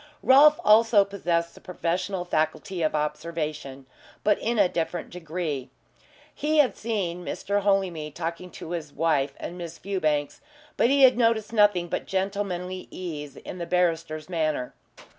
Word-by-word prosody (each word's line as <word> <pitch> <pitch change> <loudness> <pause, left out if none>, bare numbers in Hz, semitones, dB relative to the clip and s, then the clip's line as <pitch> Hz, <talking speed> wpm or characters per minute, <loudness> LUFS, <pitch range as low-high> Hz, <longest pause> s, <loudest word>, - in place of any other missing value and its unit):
Rolfe 295 +3 +7
also 215 -1 +6
possessed 170 -4 -1
the - - -16
professional 180 +1 -2
faculty 165 +2 -1
of 155 -1 +1
observation, 150 -3 -3 0.4
but 210 -1 +3
in 235 +1 -1
a 200 -3 +5
different 175 0 -3
degree. 160 -6 -4 0.6
He 310 +1 0
had 290 -4 +4
seen 190 -6 -3
Mr. 200 +3 -2
Holymead 185 -7 0
talking 170 +2 -4
to 160 - -8
his 160 -4 -4
wife 145 -3 0
and 175 +1 -6
Miss 170 -1 -7
Fewbanks, 155 -7 -1 0.3
but 235 - +3
he 275 0 +4
had 255 -2 +6
noticed 225 -2 +2
nothing 205 -5 +4
but - - -4
gentlemanly 190 -2 -3
ease 150 -6 -6
in 180 - -8
the 170 - -4
barrister's 165 -3 0
manner. 155 -7 -1
175 Hz, 145 wpm, -26 LUFS, 155-200 Hz, 0.6 s, Rolfe